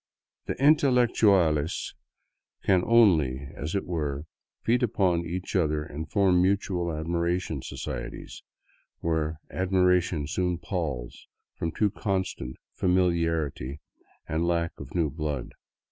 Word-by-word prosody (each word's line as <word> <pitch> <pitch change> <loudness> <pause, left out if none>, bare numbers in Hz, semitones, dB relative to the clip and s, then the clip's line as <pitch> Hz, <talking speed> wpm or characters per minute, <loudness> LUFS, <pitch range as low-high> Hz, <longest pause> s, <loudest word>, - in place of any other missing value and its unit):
The - - -1
intelectiiales 115 - +3 0.7
can 95 -2 +4
only, 80 - +4
as 75 +7 -4
it 100 - -1
were, 75 -4 -3 0.4
feed 120 +2 +2
upon 90 -7 +1
each 90 +4 -4
other 75 -4 +1
and 75 +1 -7
form 95 -2 +3
mutual 95 -2 +1
admiration 85 0 -1
societies, - - -6 0.6
where 80 -1 0 0.2
admiration 90 -3 +2
soon 90 +3 -1
palls 75 - -4 0.3
from 85 - -3
too 105 +5 +1
constant 95 - -2 0.2
familiarity 80 -7 0 0.5
and 80 +2 0
lack 85 -1 +1
of 70 +3 -9
new 80 -5 +1
blood. 75 -4 -3
85 Hz, 110 wpm, -27 LUFS, 75-95 Hz, 0.7 s, can